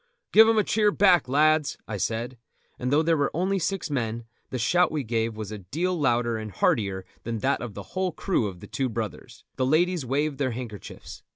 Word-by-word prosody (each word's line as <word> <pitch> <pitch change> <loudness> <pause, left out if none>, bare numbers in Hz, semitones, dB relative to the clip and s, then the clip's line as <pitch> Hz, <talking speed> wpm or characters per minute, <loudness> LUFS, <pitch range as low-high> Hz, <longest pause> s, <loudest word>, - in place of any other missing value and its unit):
"Give 220 +1 +8
them 225 0 +3
a 215 - +4
cheer 210 0 +2
back, 190 -8 +4
lads," 155 +2 +3
I 105 - -4
said; 115 +4 -3 0.4
and 125 +1 -2
though 150 +3 +4
there 165 0 +3
were 145 -2 +1
only 190 +3 +1
six 190 -2 -2
men, 115 -3 -2 0.2
the 130 - -3
shout 175 +9 +2
we 150 -3 -2
gave 115 -1 -1
was 110 -1 -6
a 105 - -6
deal 160 - -2
louder 120 -6 +1
and 110 0 -6
heartier 95 -2 0 0.2
than 115 0 -3
that - - +1
of 120 -4 -6
the - - -6
whole 185 -1 0
crew 170 - 0
of 90 -3 -8
The - - -10
Two 135 -2 -2
Brothers; 110 -3 -6
the 130 - +1
ladies 170 +3 +2
waved 140 +3 -1
their 130 -4 0
handkerchiefs. 110 -5 -8
130 Hz, 210 wpm, -26 LUFS, 115-170 Hz, 0.4 s, Give